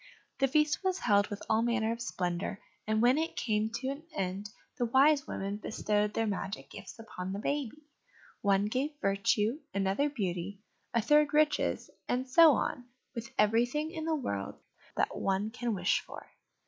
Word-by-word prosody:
The 270 Hz, -, +4 dB
feast 300 Hz, +5 st, +2 dB
was 375 Hz, -1 st, +1 dB
held 205 Hz, -, +3 dB
with 205 Hz, -1 st, -6 dB
all 220 Hz, 0 st, +3 dB
manner 235 Hz, -1 st, +1 dB
of 230 Hz, +1 st, -4 dB
splendour 180 Hz, -2 st, -2 dB, 0.3 s
and 215 Hz, +1 st, +2 dB
when 255 Hz, +5 st, +5 dB
it 325 Hz, +1 st, -2 dB
came 215 Hz, -1 st, 0 dB
to 260 Hz, +2 st, -2 dB
an 280 Hz, +3 st, -5 dB
end 195 Hz, +2 st, -3 dB, 0.3 s
the 240 Hz, -, +2 dB
Wise 275 Hz, +4 st, +4 dB
Women 195 Hz, +1 st, -3 dB
bestowed 210 Hz, 0 st, -1 dB
their 225 Hz, -, +1 dB
magic 200 Hz, 0 st, -4 dB
gifts -, -, -10 dB
upon 190 Hz, -5 st, -6 dB
the -, -, -3 dB
baby: 285 Hz, +5 st, -3 dB, 0.6 s
one 200 Hz, 0 st, +3 dB
gave 265 Hz, +7 st, -1 dB
virtue, 210 Hz, +5 st, +1 dB, 0.2 s
another 195 Hz, +9 st, +1 dB
beauty, 195 Hz, -6 st, -3 dB, 0.3 s
a 230 Hz, -2 st, +1 dB
third 295 Hz, +2 st, +4 dB
riches, 305 Hz, 0 st, +2 dB, 0.2 s
and 255 Hz, +1 st, 0 dB
so 315 Hz, +4 st, +7 dB
on 245 Hz, -1 st, -2 dB, 0.3 s
with 235 Hz, -1 st, -6 dB
everything 240 Hz, +9 st, +2 dB
in 315 Hz, -1 st, -5 dB
the 320 Hz, -1 st, +1 dB
world 100 Hz, -, -3 dB, 0.4 s
that -, -, 0 dB
one 195 Hz, +3 st, 0 dB
can 240 Hz, -2 st, -2 dB
wish 180 Hz, 0 st, +2 dB
for. -, -, -11 dB
230 Hz, 170 wpm, -31 LUFS, 200-280 Hz, 0.6 s, so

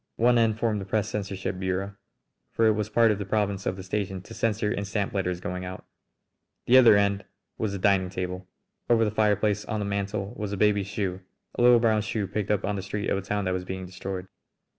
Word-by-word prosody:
One 120 Hz, +1 st, +4 dB
end 110 Hz, -2 st, +2 dB
formed 110 Hz, -3 st, 0 dB
the -, -, -6 dB
press 105 Hz, +1 st, -1 dB
censorship 95 Hz, -3 st, -4 dB
bureau, 95 Hz, +1 st, -2 dB, 0.6 s
for 115 Hz, -, +2 dB
it 110 Hz, -, +6 dB
was 105 Hz, 0 st, -1 dB
part 115 Hz, 0 st, +4 dB
of 105 Hz, -, -1 dB
the -, -, -2 dB
province 100 Hz, -1 st, -1 dB
of 95 Hz, -, 0 dB
the 95 Hz, -, -8 dB
station 95 Hz, 0 st, -3 dB
to -, -, -11 dB
censor 105 Hz, -1 st, 0 dB
and 100 Hz, -1 st, -2 dB
stamp 100 Hz, 0 st, -2 dB
letters 90 Hz, -3 st, -1 dB
going 90 Hz, 0 st, -4 dB
out. 90 Hz, 0 st, -7 dB, 0.8 s
The 130 Hz, +2 st, +7 dB
other 115 Hz, -5 st, +7 dB
end 100 Hz, 0 st, +1 dB, 0.4 s
was 105 Hz, -3 st, -1 dB
the -, -, -2 dB
dining 95 Hz, -1 st, +2 dB
table. 90 Hz, 0 st, -5 dB, 0.4 s
Over 115 Hz, -1 st, +4 dB
the 105 Hz, -, 0 dB
fireplace 105 Hz, -1 st, +1 dB
on 110 Hz, -2 st, -3 dB
the 105 Hz, -, -2 dB
mantel 100 Hz, +1 st, -3 dB
was 105 Hz, -3 st, -4 dB
a -, -, -2 dB
baby's 100 Hz, -1 st, +2 dB
shoe, 95 Hz, -2 st, -3 dB, 0.3 s
a -, -, -2 dB
little 120 Hz, 0 st, +7 dB
brown 110 Hz, -2 st, +3 dB
shoe 105 Hz, -1 st, -2 dB
picked 100 Hz, +1 st, -3 dB
up 105 Hz, -1 st, +1 dB
on 105 Hz, -, -1 dB
the -, -, -3 dB
street 100 Hz, +2 st, -3 dB
of -, -, +2 dB
a -, -, -5 dB
town 100 Hz, +1 st, -2 dB
that 95 Hz, -, 0 dB
was 90 Hz, 0 st, -2 dB
being 95 Hz, 0 st, -5 dB
destroyed. 95 Hz, +1 st, -6 dB
100 Hz, 230 wpm, -26 LUFS, 95-105 Hz, 0.8 s, The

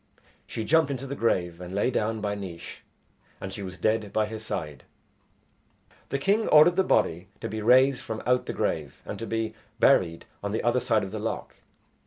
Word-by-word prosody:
She 110 Hz, -, -4 dB
jumped 160 Hz, +4 st, +3 dB
into 135 Hz, -1 st, -4 dB
the 135 Hz, -, -5 dB
grave 90 Hz, -8 st, 0 dB
and 90 Hz, +1 st, -7 dB
lay 105 Hz, +5 st, +1 dB
down 110 Hz, -2 st, -1 dB
by 105 Hz, -1 st, -1 dB
Naois, 90 Hz, -4 st, -7 dB, 0.6 s
and 95 Hz, -, -6 dB
she 100 Hz, -, -6 dB
was 95 Hz, -1 st, -7 dB
dead 110 Hz, -1 st, 0 dB
by 110 Hz, -, +1 dB
his 110 Hz, 0 st, -7 dB
side. 75 Hz, -10 st, -5 dB, 1.3 s
The 140 Hz, -, 0 dB
king 200 Hz, +10 st, +1 dB
ordered 155 Hz, +3 st, +7 dB
the 190 Hz, -, +3 dB
body 90 Hz, -, +1 dB
to -, -, -4 dB
be 110 Hz, +1 st, -4 dB
raised 130 Hz, +4 st, +5 dB
from 110 Hz, -1 st, -5 dB
out 125 Hz, +1 st, +2 dB
the -, -, -1 dB
grave -, -, -2 dB
and -, -, -6 dB
to 115 Hz, -, -5 dB
be 115 Hz, -1 st, -2 dB, 0.3 s
buried 90 Hz, -11 st, +3 dB, 0.2 s
on 100 Hz, 0 st, -2 dB
the 110 Hz, -, -1 dB
other 120 Hz, +2 st, +3 dB
side 115 Hz, -3 st, +1 dB
of 95 Hz, -, -5 dB
the 110 Hz, -, -4 dB
loch. 110 Hz, +2 st, -4 dB
110 Hz, 200 wpm, -27 LUFS, 95-125 Hz, 1.3 s, ordered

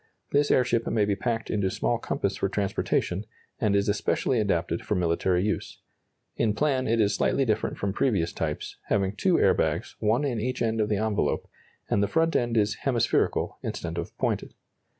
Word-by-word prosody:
This 145 Hz, +1 st, +3 dB
airship 120 Hz, -2 st, +2 dB
may 105 Hz, -2 st, +2 dB
be 100 Hz, -1 st, +1 dB
packed 115 Hz, +1 st, -2 dB
into 100 Hz, -3 st, +1 dB
small -, -, 0 dB
compass -, -, -2 dB
for 100 Hz, -, 0 dB
transportation, 100 Hz, -1 st, -1 dB, 0.4 s
and 105 Hz, -3 st, +2 dB
is 100 Hz, 0 st, +2 dB
especially 105 Hz, +4 st, +1 dB
adapted 85 Hz, -5 st, 0 dB
for 105 Hz, -, -1 dB
military 90 Hz, +1 st, +1 dB
use. 105 Hz, -, -2 dB, 0.6 s
In 105 Hz, -2 st, +1 dB
plan 135 Hz, -2 st, +1 dB
it 115 Hz, +1 st, +2 dB
is 105 Hz, -1 st, +3 dB
slightly 135 Hz, -, +1 dB
different 110 Hz, -2 st, -1 dB
from 100 Hz, -1 st, -2 dB
previous 95 Hz, -9 st, +1 dB
types, 75 Hz, -2 st, -4 dB
having 100 Hz, 0 st, +1 dB
two 180 Hz, -, +2 dB
air -, -, +5 dB
bags, -, -, -1 dB
one 110 Hz, +6 st, +2 dB
in 120 Hz, -6 st, -1 dB
each 130 Hz, +3 st, -2 dB
end 115 Hz, -1 st, +1 dB
of 105 Hz, -, 0 dB
the 105 Hz, -, +1 dB
envelope, 110 Hz, 0 st, 0 dB, 0.4 s
and 100 Hz, -, +1 dB
the 100 Hz, -, +2 dB
front 165 Hz, +5 st, +1 dB
end 120 Hz, -1 st, +1 dB
is 105 Hz, 0 st, +2 dB
hemispherical 120 Hz, -4 st, 0 dB
instead 85 Hz, 0 st, -4 dB
of 85 Hz, -, -7 dB
pointed. -, -, -2 dB
105 Hz, 185 wpm, -27 LUFS, 100-120 Hz, 0.6 s, air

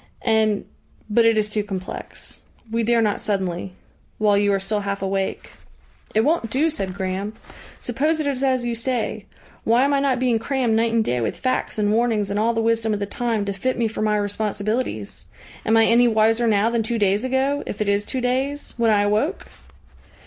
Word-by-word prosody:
And 220 Hz, -3 st, +2 dB, 0.5 s
but 230 Hz, +2 st, +4 dB
it 225 Hz, -1 st, +4 dB
is 210 Hz, 0 st, 0 dB
too 210 Hz, 0 st, 0 dB
complex. 190 Hz, -3 st, -7 dB, 0.3 s
We 230 Hz, 0 st, 0 dB
dare 230 Hz, 0 st, +3 dB
not 210 Hz, -2 st, 0 dB
suddenly 190 Hz, -2 st, -2 dB, 0.4 s
while 210 Hz, -1 st, +3 dB
you 205 Hz, 0 st, +3 dB
are 195 Hz, -, +2 dB
still 205 Hz, +2 st, -2 dB
half 200 Hz, -1 st, -3 dB
awake." 195 Hz, 0 st, -2 dB, 0.6 s
"It 220 Hz, -, +5 dB
won't 290 Hz, -2 st, +1 dB
do," 305 Hz, +7 st, +1 dB
said 190 Hz, -, -4 dB
Graham. 195 Hz, +2 st, -3 dB, 0.5 s
"Suppose 300 Hz, +7 st, 0 dB
it 310 Hz, -, -1 dB
is 275 Hz, -2 st, -1 dB
as 260 Hz, -2 st, +1 dB
you 240 Hz, -, -1 dB
say 230 Hz, -3 st, -2 dB, 0.4 s
why 235 Hz, +3 st, +3 dB
am 285 Hz, +1 st, +2 dB
I 280 Hz, -, +3 dB
not 270 Hz, -3 st, +1 dB
being 245 Hz, -3 st, +2 dB
crammed 255 Hz, -1 st, 0 dB
night 225 Hz, +1 st, +2 dB
and 225 Hz, -1 st, +2 dB
day 125 Hz, 0 st, 0 dB
with 115 Hz, -, -2 dB
facts 255 Hz, -3 st, -1 dB
and 205 Hz, -1 st, +1 dB
warnings 220 Hz, -3 st, +1 dB
and 205 Hz, -, 0 dB
all 230 Hz, +2 st, +1 dB
the 225 Hz, -, 0 dB
wisdom 225 Hz, -1 st, +1 dB
of -, -, -4 dB
the 200 Hz, -, -1 dB
time 225 Hz, 0 st, -2 dB
to 200 Hz, -, -2 dB
fit 255 Hz, +7 st, -2 dB
me 235 Hz, -, +1 dB
for 220 Hz, -, -5 dB
my 210 Hz, -1 st, +2 dB
responsibilities? 205 Hz, -, -3 dB, 0.4 s
Am 225 Hz, +1 st, +4 dB
I 225 Hz, -, +6 dB
any 240 Hz, +2 st, +5 dB
wiser 225 Hz, +1 st, +3 dB
now 215 Hz, +1 st, +3 dB
than 235 Hz, -1 st, +1 dB
two 230 Hz, +2 st, -2 dB
days 205 Hz, +1 st, +2 dB
ago, 265 Hz, +2 st, 0 dB
if -, -, -5 dB
it 210 Hz, -, -1 dB
is 200 Hz, 0 st, +2 dB
two 255 Hz, +4 st, -3 dB
days, 265 Hz, +4 st, -2 dB
when 230 Hz, -1 st, +2 dB
I 205 Hz, -1 st, +4 dB
awoke?" 215 Hz, -, 0 dB
220 Hz, 205 wpm, -22 LUFS, 205-245 Hz, 0.6 s, I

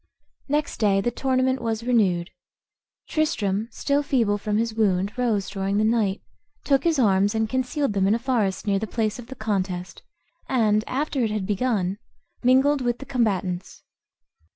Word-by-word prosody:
Next 295 Hz, +1 st, -1 dB
day 200 Hz, -3 st, +3 dB
the 240 Hz, +5 st, 0 dB
tournament 260 Hz, +1 st, 0 dB
was 225 Hz, -1 st, -2 dB
renewed. 195 Hz, -8 st, +1 dB, 0.8 s
Tristram, 215 Hz, -9 st, 0 dB
still 280 Hz, +4 st, 0 dB
feeble 230 Hz, -8 st, +1 dB
from 210 Hz, +1 st, -1 dB
his 230 Hz, 0 st, 0 dB
wound, 200 Hz, -2 st, +1 dB
rose 230 Hz, -6 st, 0 dB
during 195 Hz, 0 st, -2 dB
the 215 Hz, -, +2 dB
night, 215 Hz, -3 st, +1 dB, 0.4 s
took 275 Hz, 0 st, +2 dB
his 330 Hz, -2 st, +3 dB
arms, 205 Hz, -3 st, +3 dB
and 220 Hz, 0 st, +1 dB
concealed 260 Hz, +1 st, -1 dB
them 195 Hz, -1 st, +2 dB
in 205 Hz, -, +3 dB
a -, -, +1 dB
forest 230 Hz, -7 st, -1 dB
near 200 Hz, -2 st, +1 dB
the 220 Hz, -, -3 dB
place 220 Hz, +1 st, -2 dB
of 235 Hz, -, -9 dB
the 265 Hz, -, -8 dB
contest, 190 Hz, -5 st, -3 dB, 0.5 s
and, 215 Hz, -4 st, +2 dB
after 280 Hz, +2 st, -2 dB
it 225 Hz, -, +1 dB
had 210 Hz, -2 st, -2 dB
begun, 205 Hz, -2 st, -1 dB, 0.4 s
mingled 265 Hz, +3 st, +4 dB
with 240 Hz, -1 st, 0 dB
the 275 Hz, -, -9 dB
combatants. 195 Hz, -8 st, -2 dB
220 Hz, 165 wpm, -24 LUFS, 200-255 Hz, 0.8 s, mingled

